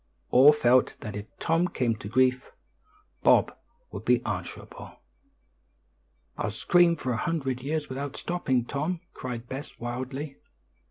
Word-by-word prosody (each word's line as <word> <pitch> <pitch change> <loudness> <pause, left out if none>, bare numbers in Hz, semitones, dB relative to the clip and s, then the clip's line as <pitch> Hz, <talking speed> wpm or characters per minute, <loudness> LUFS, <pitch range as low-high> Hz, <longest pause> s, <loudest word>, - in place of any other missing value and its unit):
All 135 +4 +8
felt 130 -4 +3
that 105 -3 -6
if 105 +1 -6
Tom 165 +2 +1
came 120 -8 0
to 100 - -8
grief, 130 +1 +2 0.7
Bob - - +4 0.4
would - - -7
be - - +2
answerable. - - -6 1.4
"I'll - - 0
scream 175 -2 +4
for 130 - -3
a - - -1
hundred 135 -4 -2
years 150 +3 -2
without 140 +1 -5
stopping, 130 -9 -1
Tom," 155 +7 -2
cried 120 -2 -6
Bess 135 +4 -7
wildly. 130 +4 -5
130 Hz, 130 wpm, -27 LUFS, 125-155 Hz, 1.4 s, All